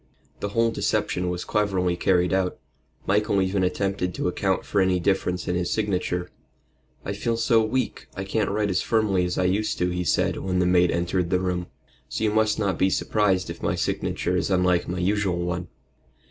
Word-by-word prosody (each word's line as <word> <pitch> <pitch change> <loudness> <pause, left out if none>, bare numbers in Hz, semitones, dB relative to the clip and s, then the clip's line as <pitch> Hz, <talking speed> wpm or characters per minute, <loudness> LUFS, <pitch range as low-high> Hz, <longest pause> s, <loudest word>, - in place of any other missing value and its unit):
The 100 - -3
whole 115 +2 +2
deception 90 -4 -1
was 90 0 -3
cleverly 95 -4 +1
carried 90 0 +2
out. 95 -1 0 0.5
Michael 100 0 +2
even 95 0 +1
attempted 90 -1 -1
to - - -1
account - - 0
for 100 - +1
any 95 -1 +2
difference 90 -1 0
in - - 0
his 90 0 -1
signature. 90 -4 -1 0.7
"I 100 - -2
feel 115 +3 -1
so 115 0 +3
weak 130 +4 -2
I 95 - -3
can't 100 +1 -1
write 105 0 0
as 90 - +1
firmly 105 -5 +1
as 90 - -3
I - - +2
used 100 +4 0
to," 90 0 0
he 90 0 -2
said, 85 - +1
when 90 -1 -2
the 90 - +2
maid 90 0 +4
entered 85 +1 0
the 90 - +2
room. 90 -1 -2 0.4
"So - - -3
you 105 - +2
must 110 0 +2
not 100 -4 -1
be 95 - +4
surprised 95 0 +1
if - - -10
my - - 0
signature - - -1
is - - 0
unlike 90 -2 +2
my 90 - -3
usual 95 0 +1
one." 85 0 -3
95 Hz, 195 wpm, -25 LUFS, 90-105 Hz, 0.7 s, maid